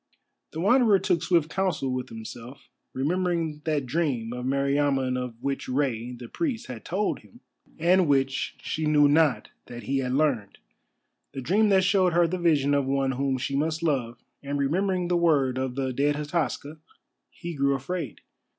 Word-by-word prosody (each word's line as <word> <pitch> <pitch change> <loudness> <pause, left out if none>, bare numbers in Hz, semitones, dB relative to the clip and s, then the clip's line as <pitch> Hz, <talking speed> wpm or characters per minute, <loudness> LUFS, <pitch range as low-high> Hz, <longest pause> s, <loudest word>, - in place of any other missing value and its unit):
The 160 - -7
Wanderer 220 +2 +5
took 180 -3 0
swift 165 -3 +1
counsel 175 -9 -1
with 130 0 -4
himself. 115 +3 -10 0.2
Remembering 165 +1 -1
that 150 -4 0
dream 125 -5 -1
of 125 +1 -4
Meriamun 140 -1 +1
of 125 -2 -4
which 140 -1 -3
Rei 125 -3 -1
the 120 -1 -9
Priest 275 - -3
had 120 -3 -8
told 200 +4 -1
him, 240 - -19 0.4
and 180 +2 +3
which 135 -1 +1
she 155 0 -2
knew 150 -1 +5
not 145 -7 +2 0.2
that 120 0 -8
he 135 0 -1
had 125 -1 -2
learned, 135 -8 0 0.8
the 135 - -5
dream 205 - +2
that 190 -1 +4
showed 185 -2 +3
her 175 0 +4
the 180 +2 -2
vision 150 -5 +2
of 140 -2 +1
one 135 0 +1
whom 135 0 -1
she 135 +2 -3
must 160 +3 -1
love, 125 -7 -1 0.2
and 140 0 -3
remembering 180 +6 0
the 175 - +1
word 140 -7 +2
of 130 -1 -3
the 135 -1 -2
dead 145 +3 +1
Hataska, 150 0 -3 0.5
he 170 -1 -7
grew 140 -2 +1
afraid. 140 - -5
145 Hz, 170 wpm, -26 LUFS, 130-170 Hz, 0.8 s, Wanderer